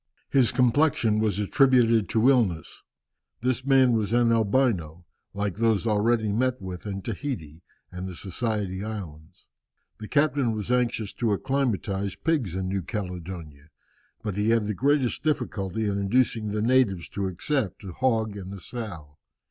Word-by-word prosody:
His 130 -4 +4
complexion 125 -3 +2
was 105 -3 +1
attributed 115 0 +3
to 115 +2 +3
illness. 110 -12 +1 0.6
This 130 0 0
man 135 -2 +5
was 110 -1 0
an 120 -1 +4
Albino, 100 - +1 0.3
like 100 -2 -2
those 115 -2 +2
already 110 0 +2
met 125 +4 0
with 95 +1 -7
in 100 -1 -4
Tahiti 95 - -5 0.3
and 90 +1 -6
the 90 - -7
Society 100 0 -3
Islands. 85 -8 -8 0.5
The 110 - -7
captain 140 -4 +2
was 110 +2 -3
anxious 120 -4 0
to 115 -4 0
acclimatize 100 -7 -1
pigs 140 - -1
in 95 0 -2
New 95 +1 -1
Caledonia, 90 -6 -6 0.5
but 105 -3 -3
he 105 +2 +1
had 115 -2 +3
the 105 - -1
greatest 135 +3 +1
difficulty 110 - -1
in 100 -1 -1
inducing 110 +1 +1
the 105 +1 -1
natives 115 -8 +2
to 100 -1 -2
accept 105 - -2
a 95 - -7
hog 110 -4 0
and 95 -1 -7
a - - -9
sow. 85 - -8
110 Hz, 150 wpm, -26 LUFS, 95-125 Hz, 0.6 s, man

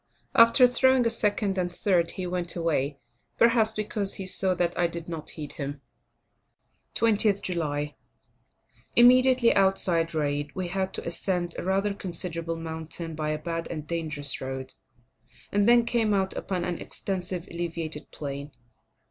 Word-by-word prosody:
After 230 +1 +7
throwing 260 0 +3
a 230 - +2
second 205 -3 0
and 175 -1 -1
third, 175 -2 +1
he 185 - -3
went 175 -1 -2
away; 150 -5 0 0.4
perhaps 230 -2 +5
because 210 -2 -2
he 190 - -5
saw 185 0 +1
that 175 -1 0
I 175 - +2
did 170 0 -7
not 165 -3 -6
heed 150 -3 -6
him. 140 -1 -6 1.1
20th 210 -3 +3
July. 150 -4 -2 1.0
Immediately 255 0 +6
outside 180 -4 +2
Raid, 145 -1 -1
we 185 -2 -3
had 190 +1 -1
to - - -5
ascend 175 0 -2
a - - -4
rather 195 +2 +1
considerable 170 -3 -4
mountain 165 0 -6
by 155 -1 -3
a 155 - 0
bad 165 +2 -4
and 155 -3 -5
dangerous 150 -4 -1
road, 130 0 -5 0.8
and 205 +1 +2
then 240 0 +6
came 225 -3 +1
out 190 -1 0
upon 180 -3 -2
an 175 -2 -3
extensive 185 -2 -4
elevated 165 -3 -4
plain. 140 0 -6
175 Hz, 150 wpm, -27 LUFS, 160-200 Hz, 1.1 s, After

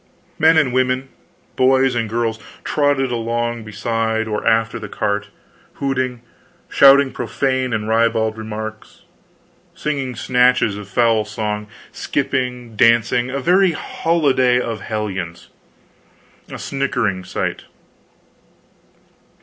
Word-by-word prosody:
Men 160 +1 +5
and 140 -6 +2
women, 130 +1 0 0.5
boys 130 0 +3
and 115 -2 -1
girls, 115 0 -1 0.2
trotted 145 -3 +1
along 120 0 -2
beside 110 +1 -1
or 105 -1 -3
after 115 0 +2
the 105 -2 -8
cart, 105 +1 -2 0.5
hooting, 130 -3 -2 0.4
shouting 140 0 +6
profane 130 +1 -1
and 110 -2 -2
ribald 110 -1 +1
remarks, 110 0 -7 0.7
singing 135 -4 -3
snatches 125 -4 +2
of 100 -1 -9
foul 115 0 +2
song, 105 -1 -4 0.2
skipping, 125 -3 -2
dancing 120 +2 +3
a 135 +2 -2
very 180 +4 +3
holiday 140 -8 +1
of 115 -4 -4
hellions, 95 -6 -5 1.0
a - - -7
sickening 125 -9 -2
sight. 90 - -4
120 Hz, 105 wpm, -19 LUFS, 110-130 Hz, 1.0 s, shouting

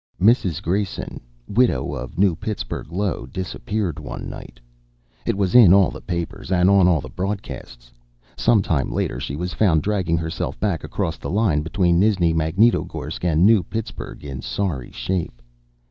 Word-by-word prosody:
Mrs. 95 - +3
Grayson, 95 +3 -2 0.3
widow, 85 - +1
of 65 -3 -7
New 95 -2 +3
Pittsburgh, 105 - -5
Io, 95 -8 -2
disappeared 95 +2 -3
one 75 - -6
night. - - -10 0.7
It - - +1
was 95 -3 0
in 105 -7 +8
all 100 -2 +4
the - - -9
papers 85 +1 -5
and 90 +1 +4
on 95 -2 +5
all 85 -5 +3
the 65 - -8
broadcasts. 65 -9 -6 0.4
Some 110 -4 +3
time 75 -7 0
later - - -2
she 70 - -4
was 90 +4 -4
found 85 -8 +3
dragging 95 -5 0
herself 80 -1 -4
back 95 -8 -1
across 80 -2 -3
the - - -5
line 100 -6 +2
between 85 +1 +1
Nizhni 95 -5 +3
Magnitogorsk 80 +10 +1
and 85 0 +3
New 110 -2 +6
Pittsburgh 110 +5 -6
in 65 -2 -6
sorry 85 -11 -3
shape. - - -3
90 Hz, 160 wpm, -22 LUFS, 80-100 Hz, 0.7 s, in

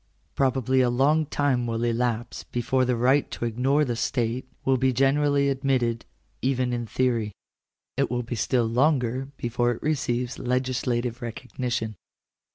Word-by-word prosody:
Pro 135 -1 +2
bably 130 0 +2
a 125 - +2
long 145 +5 +2
time 135 -5 +1
will 115 0 -2
elapse 120 0 -1
before 130 +2 0
the 125 0 +1
right 130 +4 +3
to - - -4
ignore 130 +6 +2
the 120 -3 -2
state 120 +1 -1 0.2
will 135 0 +3
be 130 +1 +2
generally 140 +2 +3
admitted, 130 -4 0 0.4
even 130 -1 0
in 120 -1 -3
theory. 115 -4 0 0.6
It - - +1
will 125 +1 -1
be 120 - -5
still 120 +2 +1
longer 130 +1 +1
before 120 0 0
it - - -10
receives 125 -5 -1
legislative 125 -1 -1
recognition. 120 -2 -4
125 Hz, 150 wpm, -25 LUFS, 120-135 Hz, 0.6 s, right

